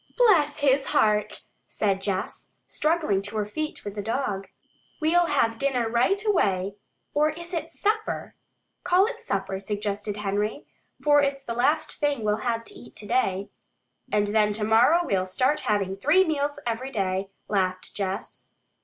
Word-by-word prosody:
"Bless 320 -12 +4
his 275 -1 +3
heart!" 210 -1 +2 0.3
said 195 -2 0
Jess, 195 -1 -3 0.2
struggling 305 - +1
to 205 +2 -5
her 210 - 0
feet 305 +9 -5
with 205 - -4
the 205 - -4
dog. 205 -3 -2 0.5
"We'll 340 +2 +3
have 230 -7 +1
dinner 260 -4 +1
right 240 - +2
away 195 - +1 0.4
or 300 +1 +3
is 340 +3 -8
it 325 -1 -3
supper?" 435 +1 -1 0.5
"Call 360 +2 +4
it 460 +1 -4
supper," 195 - -3
suggested 205 0 -3
Henry, 210 +5 -2 0.4
"for 290 -1 +5
it's 275 -1 -1
the 235 - -4
last 300 +6 +1
thing 290 -6 0
we'll 210 0 +1
have 230 -1 -1
to - - -9
eat - - -13
today." 205 -3 -1 0.6
"And 210 0 +2
then 210 0 +3
tomorrow 225 +10 +4
we'll 190 - 0
start 260 +10 +1
having 195 -2 +1
three 295 - +4
meals 290 -2 -1
every 240 +3 -2
day," 195 -3 -1 0.2
laughed 185 -2 -1
Jess. 195 -1 -4
230 Hz, 155 wpm, -26 LUFS, 205-295 Hz, 0.6 s, for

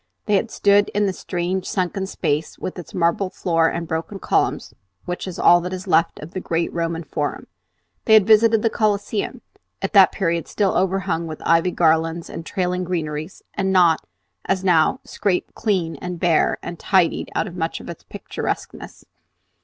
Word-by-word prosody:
They 210 - 0
had 205 +3 +2
stood 205 -1 +3
in 205 0 +2
the 195 - 0
strange 180 +1 -3
sunken 190 +1 -2
space 155 -4 -2
with 185 - -6
its 175 - -10
marble 175 +2 +1
floor 165 -3 +1
and 170 0 -3
broken 165 +5 -3
columns, - - 0 0.3
which 180 +2 -4
is 185 - -6
all 175 0 +6
that 180 +2 -5
is 185 0 -5
left 165 -3 +2
of 150 +3 -9
the 185 - -4
great 170 -2 -2
Roman 165 0 -2
Forum. 150 -1 -3 0.6
They 220 - +6
had 215 -3 +6
visited 220 0 +5
the 225 - +3
Coliseum, 205 -1 -1 0.4
at - - -3
that - - +7
period 170 -4 -1
still 200 -2 0
overhung 185 -3 0
with 155 -1 -7
ivy 165 +2 +3
garlands 165 -1 +1
and 165 - -6
trailing 180 0 -2
greeneries, 160 -2 -4
and 190 -1 -1
not, 175 -4 +4 0.4
as 190 -1 0
now, 180 +6 +3
scraped 190 -4 -2
clean 185 -7 -1
and 180 -1 -6
bare 170 -2 +2
and 170 - -7
"tidied" 185 -4 +1
out - - +1
of 180 -4 -8
much 165 -2 -2
of - - -11
its 170 - -8
picturesqueness. - - -6
180 Hz, 175 wpm, -21 LUFS, 165-195 Hz, 0.6 s, that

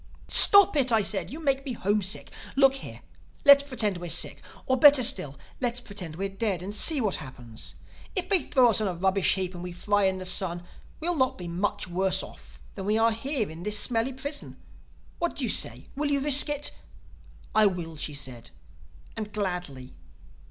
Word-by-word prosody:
"'Stop 400 -3 +8
it!' 265 -4 +2
I 220 -2 +2
said. 195 0 -1
'You 300 - -8
make 275 -3 -1
me 270 -3 -5
homesick. 205 -2 -2 0.2
Look 270 0 +4
here: - - -10 0.4
let's 280 0 +8
pretend 230 -9 -2
we're 175 0 -7
sick—or 260 - -3
better 285 0 +6
still, 165 - 0 0.2
let's 245 -1 -2
pretend 200 -9 -9
we're 195 +3 -3
dead; 195 -2 -3
and 200 +2 -6
see 290 +8 +2
what 210 -6 -1
happens. 115 - -10 0.4
If 370 - -1
they 385 -4 +3
throw 250 -4 +3
us 220 - -1
on 215 - -1
a 180 - -3
rubbish 190 +2 +1
heap 185 -1 -3
and 175 - -9
we 180 0 -7
fry 205 +3 0
in 190 0 0
the 185 - -7
sun, 175 -1 -1 0.4
we'll 345 +2 -2
not 260 -3 0
be 180 - -8
much 180 +3 -3
worse 190 +1 -1
off - - -14
than 195 - -7
we 215 +1 +1
are 225 +1 +3
here 230 0 -2
in 160 +2 -10
this 210 +3 -1
smelly 235 +3 0
prison. 285 +3 -7 0.6
What 345 0 -2
do - - -3
you - - 0
say? - - 0
Will 295 +1 -2
you 285 -1 +1
risk 290 +1 +5
it?' 290 0 -1 0.8
"'I 215 -1 +4
will,' 170 -4 -5
she 150 0 -4
said—'and 85 - -10
gladly. 180 -11 -5
205 Hz, 190 wpm, -26 LUFS, 175-265 Hz, 0.8 s, Stop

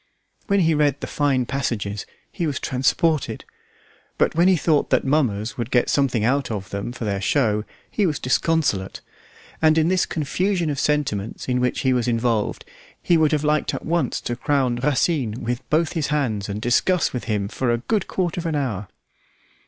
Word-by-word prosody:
When 200 -2 +3
he 165 -1 +3
read 145 -2 +2
the - - -4
fine 140 -4 +1
passages 110 -7 -3 0.2
he 170 - -2
was 140 -3 -2
transported, 150 +3 0 0.7
but - - +2
when 170 +3 +4
he 190 - +5
thought 155 -3 +1
that - - +2
mummers 130 -4 0
would 120 0 -2
get 120 -1 +2
something 130 -6 +1
out 135 +3 +1
of 100 -3 -5
them 100 +4 -4
for 120 -2 -6
their 100 -2 -1
show, 105 -2 +1 0.3
he 205 -3 +1
was 150 - -1
disconsolate; 130 - 0 0.6
and 155 0 +4
in 160 +1 +3
this 185 0 +2
confusion 170 +2 -1
of 140 - -3
sentiments 140 -10 -1
in 125 -1 +1
which 125 0 0
he 130 -1 +2
was 125 -2 0
involved 115 -2 0 0.3
he 175 - +2
would 160 -2 +3
have 150 -1 +1
liked 150 0 +1
at - - -6
once 165 -5 0
to 120 - -3
crown 130 -2 0
Racine 130 -3 0
with 120 +2 -2
both 155 +1 +1
his 160 -5 -1
hands 115 -9 -1
and 100 +1 -3
discuss 125 +10 +2
with 125 - -4
him 105 -3 -1
for 125 +4 -2
a 120 - +2
good 205 - -1
quarter 175 -2 -1
of 165 - -4
an 160 - -1
hour. 110 -9 -2
135 Hz, 190 wpm, -22 LUFS, 115-155 Hz, 0.7 s, he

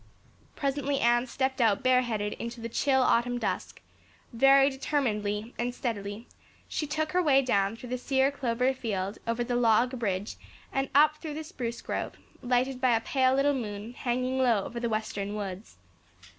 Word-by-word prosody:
Presently 280 0 -1
Anne 240 0 +3
stepped 265 +1 -1
out 225 +2 +3
bareheaded 240 -5 +1
into 235 +1 -5
the 230 0 -5
chill 265 +2 +2
autumn 245 0 +2
dusk; - - -3 0.5
very 270 +3 +6
determinedly 230 -6 -1
and 245 +1 -2
steadily 210 -2 -4 0.4
she 300 - -3
took 310 +1 -2
her 365 - +2
way 275 -5 +4
down 200 -4 +1
through 245 +1 -10
the 250 0 -2
sere 265 +1 +2
clover 250 -1 0
field 200 -6 -3
over 230 +1 0
the 245 0 -2
log 245 +2 +3
bridge 200 -2 -2 0.4
and 270 0 0
up 305 +1 +5
through 305 -2 -6
the 315 - -4
spruce 240 -8 -5
grove, - - -3 0.3
lighted 250 +1 0
by 250 -3 +4
a 225 - 0
pale 260 +1 +2
little 285 +1 +3
moon 215 -3 -5
hanging 255 +1 -1
low 235 -6 +3
over 235 - -6
the 235 0 -1
western 210 -2 -3
woods. 195 - -6
245 Hz, 170 wpm, -28 LUFS, 225-270 Hz, 0.5 s, very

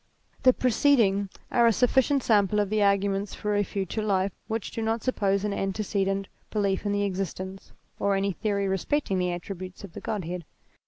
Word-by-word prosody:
The 255 - +7
preceding 230 -6 +3 0.2
are 235 -1 +5
a - - +6
sufficient 265 +3 +3
sample 210 -1 +3
of 205 -1 0
the 215 - +2
argu 200 -1 +3
ments 195 +1 -2
for 210 0 -1
a 205 - +3
future 200 +2 -3
life 195 -2 +1 0.2
which 220 -1 -3
do 225 - -4
not 225 0 -1
suppose 200 -6 +1
an 210 -1 -1
antecedent 195 0 -1 0.2
belief 200 -1 0
in - - +1
the 205 0 +1
existence, 190 0 -4 0.3
or 200 0 +2
any 195 +1 +1
theory 200 +1 -1
respecting 195 - 0
the 180 0 0
attributes 185 +1 -7
of 195 -4 -9
the - - -8
Godhead. 180 -5 -3
200 Hz, 180 wpm, -27 LUFS, 195-215 Hz, 0.3 s, The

